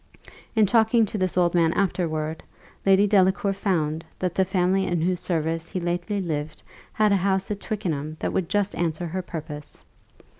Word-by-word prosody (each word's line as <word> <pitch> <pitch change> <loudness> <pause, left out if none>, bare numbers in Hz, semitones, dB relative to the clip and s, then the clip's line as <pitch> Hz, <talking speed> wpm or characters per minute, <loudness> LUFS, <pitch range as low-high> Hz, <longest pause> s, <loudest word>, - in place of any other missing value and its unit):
In 220 -1 +5
talking 225 +2 +4
to 210 - -5
this 185 -1 0
old 175 -1 +3
man 165 -2 +3
afterward, 160 -5 -1 0.5
Lady 195 +1 +6
Delacour 195 -1 +3
found, 165 -5 -1
that 180 -2 -2
the 190 - +3
family 190 +1 +1
in 175 -1 0
whose 180 0 +1
service 165 -1 -2
he 185 - -3
lately 175 +4 -2
lived 155 -4 -4 0.3
had 215 -1 +2
a 200 - +4
house 190 +1 0
at 205 - -3
Twickenham 160 -8 -3
that - - -2
would 180 -2 -1
just 205 0 0
answer 170 0 -2
her 180 +3 -3
purpose. 155 -4 -8
180 Hz, 175 wpm, -25 LUFS, 165-195 Hz, 0.5 s, Lady